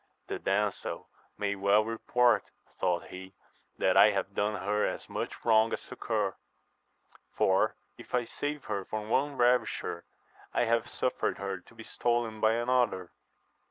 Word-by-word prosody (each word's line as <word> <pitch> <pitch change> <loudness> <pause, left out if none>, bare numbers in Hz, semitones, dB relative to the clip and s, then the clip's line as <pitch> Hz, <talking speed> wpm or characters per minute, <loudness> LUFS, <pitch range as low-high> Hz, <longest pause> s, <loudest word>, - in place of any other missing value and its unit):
The - - -3
damsel 100 0 -1 0.3
may 100 -1 0
well 100 +2 +3
report, 115 -1 +2 0.3
thought 90 -2 0
he, 95 +1 -10 0.4
that 95 - +2
I 100 +2 +8
have 100 -1 -2
done 105 +1 0
her 105 +2 0
as - - -2
much - - -5
wrong 110 -1 +5
as - - -2
succour; 110 -6 -2 1.0
for, - - +3 0.2
if - - -5
I 120 -1 +1
saved 145 +4 -4
her 100 -2 -2
from 110 +2 -5
one 140 +2 +1
ravisher, 125 +1 +1 0.5
I - - +3
have 115 0 +1
suffered 130 - -1
her 95 -1 -4
to 90 - -20
be 115 - -10
stolen 120 -2 -1
by 110 0 +4
another. 120 -6 +1
110 Hz, 150 wpm, -30 LUFS, 100-120 Hz, 1.0 s, I